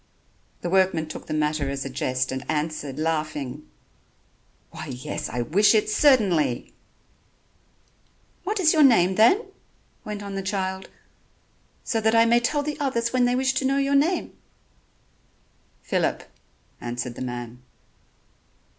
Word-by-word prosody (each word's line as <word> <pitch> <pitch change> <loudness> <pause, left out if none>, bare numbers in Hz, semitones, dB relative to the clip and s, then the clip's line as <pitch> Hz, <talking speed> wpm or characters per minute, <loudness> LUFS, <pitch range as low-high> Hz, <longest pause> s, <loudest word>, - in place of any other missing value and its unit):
The 175 - -3
workman 185 -4 +2
took - - -9
the - - -4
matter 150 -2 0
as 140 0 -4
a - - -4
jest 130 -1 -1
and 130 0 -4
answered 150 -3 -3
laughing: 150 -3 -3 1.0
"Why, 155 - -8
yes, 125 -2 -5
I 120 -1 -2
wish 205 - +4
it 215 0 +2
certainly." 190 - +2 1.7
"What 415 +2 -2
is 325 -4 +4
your 315 - +4
name, 205 -10 +5
then?" 235 - +4 0.6
went 210 -1 -6
on 200 -1 -6
the 195 - -3
child, 190 -1 -3 0.9
"so 225 -2 -1
that 220 +1 +2
I 230 0 +6
may 235 +1 +4
tell 290 +5 0
the 300 +1 -4
others 235 -4 -1
when 250 -1 +3
they 245 0 +1
wish 265 +1 +1
to - - -1
know 270 +1 +2
your 275 0 +1
name?" 315 +6 +1 1.5
"Phillip," - - -1 0.6
answered 120 0 -4
the - - -9
man. 120 -1 -6
190 Hz, 140 wpm, -24 LUFS, -, 1.7 s, I